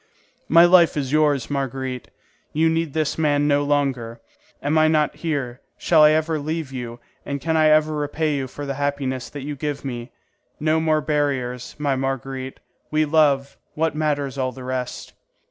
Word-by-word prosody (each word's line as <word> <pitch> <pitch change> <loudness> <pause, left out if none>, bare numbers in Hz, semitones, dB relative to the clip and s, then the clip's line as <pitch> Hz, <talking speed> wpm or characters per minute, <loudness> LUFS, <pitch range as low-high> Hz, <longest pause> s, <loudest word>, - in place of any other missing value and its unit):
"My 170 +1 +7
life 175 -3 +5
is 135 -3 -2
yours, 145 -6 +2
Marguerite; 130 -2 -3 0.4
you 160 +2 +3
need 165 -2 -1
this 155 -1 -1
man 145 -2 +2
no 145 0 +3
longer. 135 -5 -1 0.4
Am 145 +2 -1
I 155 - +5
not 155 -1 +1
here? 140 -6 -3 0.2
Shall 160 -3 +4
I 150 - +8
ever 155 0 +1
leave 155 -1 -4
you, 120 -2 -6 0.2
and 140 0 -4
can 160 +3 -1
I 155 -1 +4
ever 155 0 +4
repay 150 +1 -1
you 135 -2 -2
for 145 +3 -7
the 140 - -3
happiness 135 -3 -2
that 145 -2 -8
you 145 0 -4
give 145 0 -4
me? 120 -2 -5 0.5
No 155 +1 +2
more 155 -1 +2
barriers, 135 -5 -2
my 145 -2 0
Marguerite; 135 0 -4 0.3
we 155 0 +2
love; 145 -3 +2 0.2
what 160 0 0
matters 145 -3 -1
all 130 -1 0
the 130 +1 -10
rest?" 125 -1 -5
145 Hz, 175 wpm, -22 LUFS, 130-155 Hz, 0.5 s, I